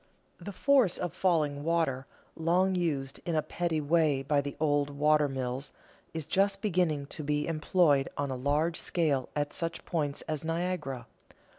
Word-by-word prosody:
The 185 +3 -7
force 255 -2 +3
of 175 -3 -3
falling 150 -6 +1
water, 155 -5 0 0.3
long 180 +4 +2
used 145 -7 -1
in 170 - -2
a 155 - +2
petty 170 -3 -1
way 150 -2 +2
by 145 +1 +2
the 140 0 -6
old 145 -2 +2
water 150 +1 +3
mills, 130 +1 -4 0.4
is 160 -2 -4
just 195 +4 +2
beginning 170 -8 +1
to 150 - -7
be 150 0 0
employed 155 -3 +2
on 140 -1 -1
a - - -2
large 150 +6 0
scale 145 -7 0
at 145 0 -1
such 165 0 -3
points 150 -4 -2
as 155 -2 -3
Niagara. 165 -7 -2
155 Hz, 160 wpm, -30 LUFS, 140-170 Hz, 0.4 s, force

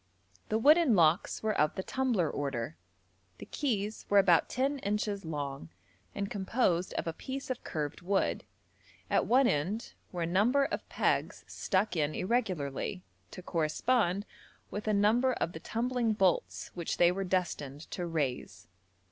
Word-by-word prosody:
The 215 - +2
wooden 295 +1 +5
locks 165 +3 +3
were 215 -1 +1
of 150 0 +2
the 190 - -3
'tumbler' 245 -10 0
order. 130 - -3 0.6
The - - -9
keys 215 -7 -2
were 205 - +4
about 180 -4 +5
10 275 +2 0
inches 205 -2 -2
long, 140 - -4 0.5
and 200 - -2
composed 190 -3 0
of - - -2
a 165 - -2
piece 265 +7 -5
of 255 - -4
curved 150 -1 -4
wood: 190 +2 0 0.7
at - - +2
one 260 +3 +5
end 180 +10 -1 0.2
were 175 -2 -2
a - - +1
number 220 +11 +3
of - - -4
pegs - - 0
stuck 190 0 0
in 155 -2 0
irregularly, 185 - -1 0.3
to 185 - -10
correspond 185 +5 +1 0.5
with 210 +1 -5
a - - +3
number 225 +6 +3
of 170 - -2
the 160 - -7
tumbling 235 +3 0
bolts 190 -4 0
which 170 -2 -3
they 175 0 +5
were 195 +2 -2
destined 170 -7 -2
to 175 -2 -3
raise. 145 -7 -3
195 Hz, 155 wpm, -31 LUFS, 165-225 Hz, 0.7 s, wooden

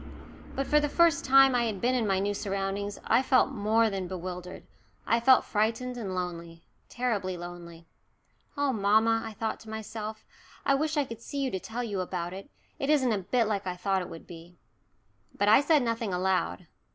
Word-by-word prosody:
But 275 - -1
for 300 - +4
the 295 0 0
first 335 -2 +3
time 270 0 +6
since 245 -1 +2
I - - +1
had 215 -4 -3
been 245 +4 +1
in 240 -4 +1
my 195 -1 +2
new 200 +2 0
surroundings 200 0 -3
I - - +4
felt 260 +1 +3
more 225 -1 +2
than 195 -3 -3
bewildered 180 0 -7 0.4
I 230 - +2
felt 255 +2 +5
frightened 225 +4 -1
and 200 -6 -4
lonely, 170 -2 -5 0.3
terribly 205 -7 -2
lonely. 170 -1 -9 0.7
"Oh, 285 -2 +1
mamma," 220 +2 +3
I 225 -1 -6
thought 220 +1 -3
to 220 - -13
myself, 220 0 -6 0.4
"I 275 - +4
wish 305 +2 0
I 290 - +2
could 230 -2 -9
see 285 - -7
you 270 -2 -1
to 190 - -2
tell 230 +6 -5
you 205 -5 -3
about 175 -1 -4
it. 195 +1 -9 0.3
It 275 - -2
isn't 270 -5 +3
a 205 - 0
bit 225 +5 +1
like 205 -3 -2
what 180 - -1
I - - -11
thought 190 +1 0
it 180 - -7
would 165 - -10
be." 170 +1 -13 0.8
But 205 - +2
I 220 +6 +7
said 295 -2 +3
nothing 230 -3 -2
aloud. 180 - -1
215 Hz, 205 wpm, -28 LUFS, 185-250 Hz, 0.8 s, I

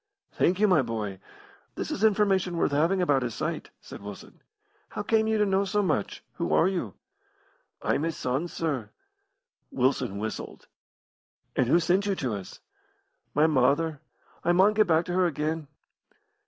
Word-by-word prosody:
"Thank 180 +2 +1
you, 210 - +5
my 180 -7 +4
boy. 110 -5 -4 0.6
This - - -4
is 205 - -3
information 195 -4 +2
worth 165 - +1
having 170 +6 +2
about 145 -6 +2
his 120 -3 -3
sight," - - -3
said - - -10
Wilson. 100 -1 -10 0.5
"How 210 - -5
came 220 +1 +2
you 220 0 +2
to 210 - +3
know 195 0 +2
so 205 +1 0
much? 105 - -1
Who - - -1
are 170 - +4
you?" 175 - -3 0.9
"I'm - - +1
his 165 0 -2
son, 135 +7 -1
sir." 145 -11 -3 0.8
Wilson 130 -6 0
whistled. 110 +2 -6 0.9
"And 125 - +2
who 165 +7 +5
sent 180 +4 +1
you 200 - +1
to 130 -9 -2
us?" 100 -3 -8 0.7
"My 150 +2 +5
mother. 150 +1 +2 0.4
I 175 - +3
maun 190 +4 +5
get 215 -1 +3
back 165 0 +3
to 180 - -4
her 185 0 +3
again." 155 0 -2
165 Hz, 165 wpm, -27 LUFS, 130-190 Hz, 0.9 s, you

